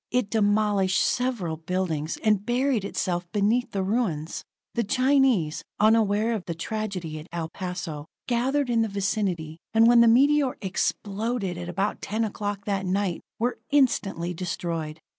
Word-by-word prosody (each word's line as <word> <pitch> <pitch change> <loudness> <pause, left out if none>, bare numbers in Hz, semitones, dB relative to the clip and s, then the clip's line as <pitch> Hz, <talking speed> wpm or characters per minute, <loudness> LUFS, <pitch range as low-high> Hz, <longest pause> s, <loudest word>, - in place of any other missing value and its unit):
It 250 -4 0
demolished 205 -3 +2
several 230 -11 0
buildings, 165 -2 -2
and 210 -2 +3
buried 245 -1 +1
itself 175 -3 -2
beneath 220 +4 +1
the 195 -1 -1
ruins. 185 -7 -1 0.3
The 235 - 0
Chinese, 255 - +2 0.2
unaware 215 +1 +3
of 210 -5 -4
the 170 - -4
tragedy 180 -4 -4
at 155 - -11
El 165 -1 -3
Paso, 170 -5 -5 0.2
gathered 255 +2 +1
in 230 -1 +3
the 225 - +1
vicinity, 190 -5 -2 0.2
and 225 0 +6
when 235 0 +7
the 235 - +6
meteor 275 +3 +4
exploded 200 0 -2
at 175 0 -6
about 195 +4 -1
ten 220 +3 -1
o'clock 205 -2 -3
that 195 -2 -1
night, 190 -2 0 0.2
were 245 +2 -1
instantly 200 - +1
destroyed. 165 -3 -4
200 Hz, 145 wpm, -26 LUFS, 175-230 Hz, 0.3 s, when